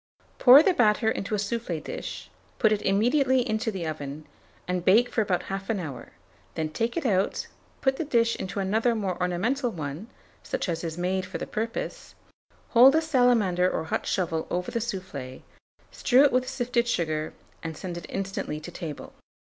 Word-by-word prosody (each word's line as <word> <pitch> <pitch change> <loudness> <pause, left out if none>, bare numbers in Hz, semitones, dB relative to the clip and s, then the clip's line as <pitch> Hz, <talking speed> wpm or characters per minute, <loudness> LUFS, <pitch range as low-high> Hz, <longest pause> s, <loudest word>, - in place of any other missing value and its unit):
Pour 270 +4 +9
the 380 - +3
batter 220 -4 +3
into 200 0 -2
a - - -1
soufflé 205 -5 -3
dish, - - -7 0.3
put 220 -4 +3
it 215 - +1
immediately 250 +5 +2
into 220 +1 -1
the 190 -5 -4
oven, 150 -1 -5 0.4
and 180 -1 -1
bake 225 +7 +4
for 225 - +1
about 185 -4 0
1/2 195 +2 -3
hour; 140 -8 -7 0.4
then 160 -1 -2
take 230 - -2
it 335 - -2
out, 195 -4 +1 0.4
put 265 0 +1
the - - -1
dish 230 -5 +2
into 190 +2 -4
another 220 +5 +1
more 195 -4 -2
ornamental 225 +10 0
one, 155 +1 -6 0.3
such - - -3
as 165 -1 -2
is 165 -1 -4
made 185 +1 0
for - - -6
the - - -4
purpose; 230 - -5 0.5
hold 255 +4 +7
a - - +5
salamander 245 - +3
or 160 - -2
hot 160 - -3
shovel 165 -4 -1
over 180 +1 -2
the 235 - -1
soufflé, 185 - -6 0.5
strew 260 +1 +4
it 285 - +4
with 255 0 +1
sifted 240 -1 0
sugar, 155 -7 -1 0.3
and 160 -2 -6
send 180 -2 -6
it 170 -2 -7
instantly 195 -5 -3
to 160 +3 -9
table. 165 -4 -7
200 Hz, 180 wpm, -26 LUFS, 175-240 Hz, 0.5 s, Pour